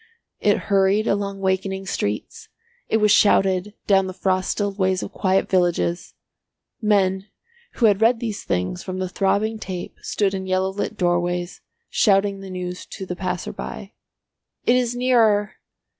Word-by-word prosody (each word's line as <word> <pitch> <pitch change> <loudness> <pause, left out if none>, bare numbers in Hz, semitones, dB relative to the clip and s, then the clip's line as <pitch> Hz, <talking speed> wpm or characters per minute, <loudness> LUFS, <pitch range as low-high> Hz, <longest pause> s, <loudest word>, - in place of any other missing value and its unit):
It - - +3
hurried 195 +2 +3
along 200 -1 -1
wakening 190 0 -1
streets, 105 - -4 0.4
it 220 - +3
was 210 -1 +3
shouted 195 -1 +3
down 195 -2 +3
the 185 - -7
frost 185 -1 0
stilled 205 -1 -2
ways 185 -1 +1
of - - -6
quiet 190 0 +1
villages; 175 -1 0 0.7
men 195 -2 +2 0.5
who 235 - +1
had 205 -1 +4
read 230 +1 +4
these 220 -4 -4
things 90 - -2
from 185 -1 -5
the 185 0 -2
throbbing 205 +4 0
tape 185 -4 -6
stood 200 -2 0
in 190 -1 -4
yellow 185 0 +1
lit 205 +2 -4
doorways 175 0 -1 0.3
shouting 200 -2 +3
the 195 0 -9
news 180 -1 -6
to 195 - -7
the 180 - -5
passersby. 65 - -5 0.7
"It 240 - +4
is 245 -1 +1
nearer." 225 -5 +2
195 Hz, 150 wpm, -22 LUFS, 185-205 Hz, 0.7 s, had